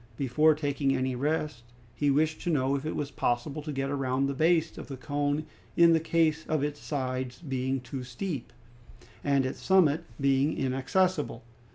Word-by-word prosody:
Before 150 +4 +3
taking 140 -2 0
any 130 0 0
rest, 150 -1 -1 0.3
he 145 +3 +1
wished 155 +3 +1
to - - -2
know 135 -4 +2
if 140 +2 -3
it - - -3
was 145 -1 -3
possible 135 +4 -1
to 150 +1 -5
get 135 0 -2
round 135 0 0
the 140 - -1
base 160 +3 +2
of - - -8
the 135 - -6
cone 145 +2 -1 0.3
in 170 -1 +7
the 165 - +4
case 160 -1 +1
of 155 -3 0
its 145 0 -2
sides 130 -3 -3
being 135 -3 -2
too 130 +1 -6
steep 125 +2 -5 0.7
and 140 -2 +2
its 130 - -4
summit 170 -4 +4 0.2
being 140 +2 +2
inaccessible. 135 - 0
145 Hz, 175 wpm, -29 LUFS, 130-155 Hz, 0.7 s, in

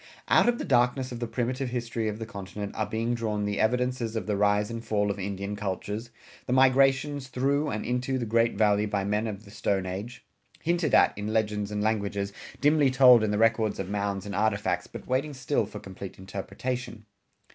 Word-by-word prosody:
Out - - +5
of 240 - +1
the - - -4
darkness 125 0 +2
of 120 - -5
the 120 - -2
primitive 125 +3 -2
history 120 -2 -2
of 105 -1 -2
the 115 - -5
continent 100 -1 -6
are 110 -2 -1
being 115 +3 -1
drawn 110 -3 -1
the 105 0 -2
evidences 125 0 0
of 110 - -2
the 105 - 0
rise 105 +2 +2
and 115 0 -5
fall 105 -2 0
of 100 - -6
Indian 100 +1 -4
cultures, 105 +3 -4 0.4
the 125 - 0
migrations 135 +1 +3
through 140 +4 0
and 110 - -3
into 125 +2 -1
the 120 - -2
great 115 +1 +2
Valley 105 -1 +3
by 100 -1 -1
men 105 +3 0
of 105 0 -6
the 100 - -13
Stone 100 -2 -1
Age, 105 +7 -6 0.4
hinted 170 -1 +2
at - - +5
in 105 +1 -4
legends 105 -2 0
and 105 0 -2
languages, 100 -2 -1 0.3
dimly 145 -1 +4
told 130 -2 +7
in 110 - +1
the 105 - 0
records 115 -1 +2
of 95 0 -4
mounds 100 -1 -2
and 100 - -5
artifacts, 100 -4 0
but - - -9
waiting 135 +3 -1
still 130 - 0
for - - -8
complete 95 0 -9
interpretation. 105 +4 -5
110 Hz, 200 wpm, -27 LUFS, 100-125 Hz, 0.4 s, told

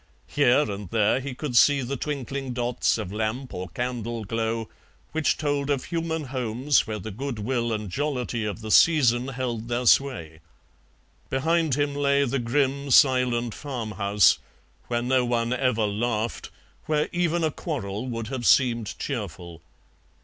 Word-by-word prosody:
Here 140 -1 +3
and 100 - -4
there 110 +3 +2
he 135 -1 -6
could 135 -2 -4
see 140 +5 +5
the 135 +3 -3
twinkling 135 -1 -4
dots 120 0 0
of 90 - -5
lamp 110 +4 -3
or 90 +1 -5
candle 120 -2 -4
glow 115 +1 -2 0.4
which 160 -1 +1
told 145 -2 -1
of 140 -3 0
human 165 -2 -2
homes 130 +1 0
where 110 -1 -3
the 105 +2 -7
goodwill 120 0 -2
and 105 -1 -3
jollity 125 0 -2
of 105 +1 -4
the 110 0 -5
season 125 -6 +5
held 125 -4 -4
their 120 +1 -1
sway. 85 - +2 0.9
Behind 160 +1 +1
him 145 0 0
lay 140 0 +2
the 135 +1 -1
grim, 140 +3 0
silent 125 -4 +4
farm 125 -6 -5
house, 100 -2 +3 0.5
where 120 0 -1
no 130 0 +2
one 120 0 0
ever 125 -4 +1
laughed, 110 +2 -2 0.4
where 150 -1 +1
even 175 -1 0
a 155 - +1
quarrel 120 - -4
would 115 -2 -4
have 130 -3 -2
seemed 120 -5 +3
cheerful. 90 - -5
125 Hz, 150 wpm, -25 LUFS, 110-140 Hz, 0.9 s, see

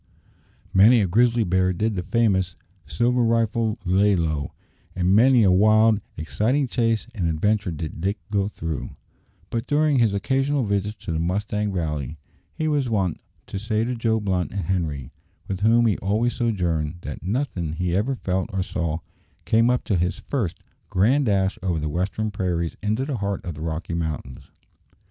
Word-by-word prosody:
Many 110 +6 +7
a 100 - +1
grizzly 115 +5 +3
bear 95 -1 +2
did 105 +4 -1
the 90 - -1
famous 95 -4 +1 0.3
"silver 125 - +1
rifle" 115 -1 +1
lay 100 +3 +3
low, 80 -4 -1 0.4
and 90 +1 +2
many 120 +2 +6
a 95 - +5
wild, 110 +2 +4 0.2
exciting 120 - 0
chase 115 -3 0
and 95 -7 -1
adventure 105 +5 +1
did 80 -1 -5
Dick 100 +4 0
go 100 -2 +1
through; 80 -7 -5 0.6
but 115 -1 -2
during 150 -2 +3
his 115 -3 +4
occasional 135 +7 0
visits 100 0 -2
to - - -3
the 80 - -1
Mustang 105 +4 -1
Valley 75 -5 -3 0.4
he 155 - -1
was 145 -5 +1
wont 95 -7 0 0.2
to 100 - -5
say 110 +1 0
to 125 - -2
Joe 115 -2 0
Blunt 95 -4 -1
and 100 -3 -3
Henri 80 -8 -2 0.4
with 95 -2 -3
whom 115 +3 +4
he 110 -4 +1
always 110 +5 0
sojourned 90 -10 -1
that 75 - -7
"nothin' 95 - -2
he 85 +1 -1
ever 120 +8 +1
felt 95 -3 -2
or 95 -1 -1
saw 85 -2 -3 0.4
came 115 +6 +3
up 125 0 +1
to 100 - 0
his 90 +1 -1
first 100 - -2 0.3
grand 125 +9 +3
dash 95 -1 +1
over 90 -3 -1
the 75 - -2
western 95 +7 -2
prairies 90 -4 -2
into 110 +6 0
the 140 -3 -3
heart 100 -1 -3
of 85 - -4
the 75 - -9
Rocky 80 +1 -4
Mountains." 80 -6 -4
100 Hz, 170 wpm, -24 LUFS, 90-115 Hz, 0.6 s, Many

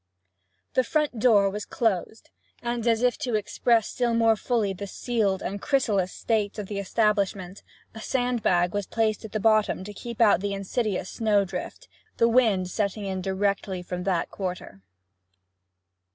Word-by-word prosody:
The 255 - +3
front 300 -3 -1
door 210 -4 +5
was 205 +1 -3
closed, 220 -1 -2 0.3
and, 240 -1 -2
as 230 0 +2
if 250 -1 +2
to 245 -3 -1
express 225 +2 +1
still 240 -2 0
more 225 -1 +4
fully 215 -3 0
the 200 +2 -7
sealed 205 -3 -1
and 200 +1 -4
chrysalis 210 -10 +1
state 215 -3 -1
of 210 - -4
the 200 +1 -4
establishment, 200 -2 0 0.3
a 220 - -9
sand 245 -1 -1
bag 175 -3 +2
was 205 -2 -2
placed 220 -1 0
at 215 - -9
the 215 - -2
bottom 215 -3 +2
to 205 +2 -8
keep 235 +3 -8
out 215 -5 +5
the 200 +1 -2
insidious 195 -1 -2
snowdrift, 205 - -1 0.3
the 230 - +4
wind 225 -6 +3
setting 205 0 -2
in 190 -1 -3
directly 195 -1 -1
from 180 0 -5
that 180 -4 0
quarter. 180 - -6
210 Hz, 160 wpm, -26 LUFS, 195-230 Hz, 0.3 s, door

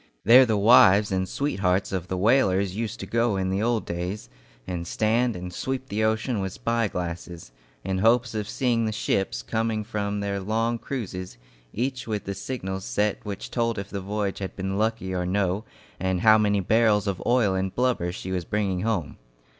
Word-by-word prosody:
There 125 +4 +8
the 110 -2 +1
wives 100 -2 +6
and 95 -1 -1
sweethearts 100 -9 0
of 90 -2 -3
the 95 - -3
whalers 100 -3 +2
used 115 0 -3
to - - -4
go 115 -3 +1
in 95 0 -1
the 95 +2 0
old 115 0 0
days, 90 - -4 0.4
and 85 -2 -4
stand 115 +4 +1
and 90 0 -6
sweep 130 +6 -4
the 105 +2 -1
ocean 110 +1 0
with 95 -1 -3
spy 115 -1 0
glasses, 85 -5 -6 0.3
in 95 0 -1
hopes 115 +3 +3
of 105 -1 -3
seeing 120 -2 +1
the 110 - -1
ships 95 - -1
coming 110 - -1
in - - -9
from 105 -2 -2
their 100 -1 -2
long 115 +4 -1
cruises 95 - -5 0.3
each 125 +2 -3
with 105 -2 -2
the 100 - -4
signals 95 -2 -5
set 105 +1 -1
which 100 -2 -6
told 115 -2 0
if 100 0 -6
the 100 - -4
voyage 100 0 -2
had 95 -1 -5
been 95 0 -3
lucky 110 -2 -1
or 90 -1 -1
no, 100 +2 0 0.3
and 95 -1 0
how 110 -1 +6
many 105 -2 +2
barrels 105 0 +3
of 100 -3 -2
oil 120 -5 +3
and 95 0 -2
blubber 125 -9 +1
she 95 +1 -6
was 90 -2 -1
bringing 100 -1 -1
home. 95 -9 -2
100 Hz, 195 wpm, -25 LUFS, 95-115 Hz, 0.4 s, There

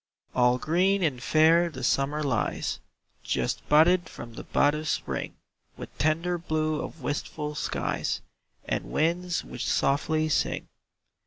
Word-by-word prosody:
All 125 0 +4
green 185 +7 +2
and 135 -7 0
fair 160 +5 +4
the 130 -5 -8
Summer 145 +3 +1
lies, 125 -6 -1 0.4
Just - - -2
budded 170 +4 +5
from 120 -1 -9
the - - -7
bud 145 0 +3
of 155 +1 -4
Spring, - - -2 0.4
With - - -9
tender 165 +3 +1
blue 155 -2 -1
of 160 - -8
wistful 150 +2 -3
skies, 150 - -2 0.5
And - - -1
winds 175 +2 0
which 125 - -6
softly 155 +3 +1
sing. 155 - 0
155 Hz, 135 wpm, -27 LUFS, 145-165 Hz, 0.5 s, budded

